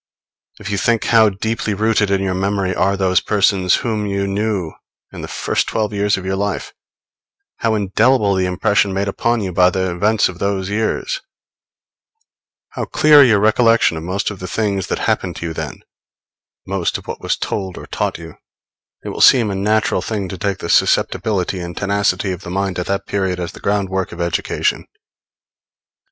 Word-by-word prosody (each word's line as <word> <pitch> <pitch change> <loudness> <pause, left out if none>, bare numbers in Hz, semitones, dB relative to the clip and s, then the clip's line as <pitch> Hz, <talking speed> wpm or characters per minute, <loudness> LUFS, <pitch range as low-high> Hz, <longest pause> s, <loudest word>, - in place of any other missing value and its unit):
If 100 - -6
you 100 - 0
think 115 0 +1
how 110 -2 +5
deeply 105 +1 -2
rooted 110 0 +1
in 100 -1 +1
your 95 -1 -1
memory 95 0 -1
are 100 +2 +1
those 95 -1 +2
persons 100 -3 +2
whom 110 -3 -1
you 100 0 -1
knew 100 -4 -2 0.4
in - - -7
the - - -6
first - - -1
twelve 110 -1 -1
years 105 0 +1
of 95 - -7
your 95 0 -1
life, 100 +1 -3 0.8
how 115 -1 0
indelible 105 +2 +2
the 95 -1 +1
impression 95 +2 +1
made 100 +1 -1
upon 115 +3 0
you 95 -3 -4
by 90 +1 +5
the 95 0 -1
events 105 +5 +2
of 90 -1 -9
those 100 -1 -1
years, 110 - -1 1.5
how - - -4
clear 150 -2 +6
your 110 -6 +4
recollection 115 -2 +3
of 80 - -5
most 95 +5 -2
of 100 - -9
the 90 - -6
things 100 -1 -1
that - - -2
happened - - -1
to - - -6
you 80 - -3
then, - - -6 0.8
most 95 -3 -1
of - - -13
what - - -6
was - - -1
told 95 -3 -4
or - - -8
taught - - -2
you, 80 -1 -11 0.7
it - - -3
will - - -4
seem 115 -5 +6
a - - -3
natural 105 -1 +1
thing 100 -1 -3
to 95 - -6
take 100 0 -1
the 85 - -6
susceptibility 95 -3 +1
and 85 0 -7
tenacity 100 -1 0
of 90 -1 -5
the 90 - -8
mind 95 0 -2
at 90 - -3
that 100 0 -2
period 95 -3 -1
as 85 -1 -4
the - - -13
ground 100 -1 0
work 95 0 -2
of 85 - -9
education. 85 -1 -1
100 Hz, 190 wpm, -18 LUFS, 95-105 Hz, 1.5 s, clear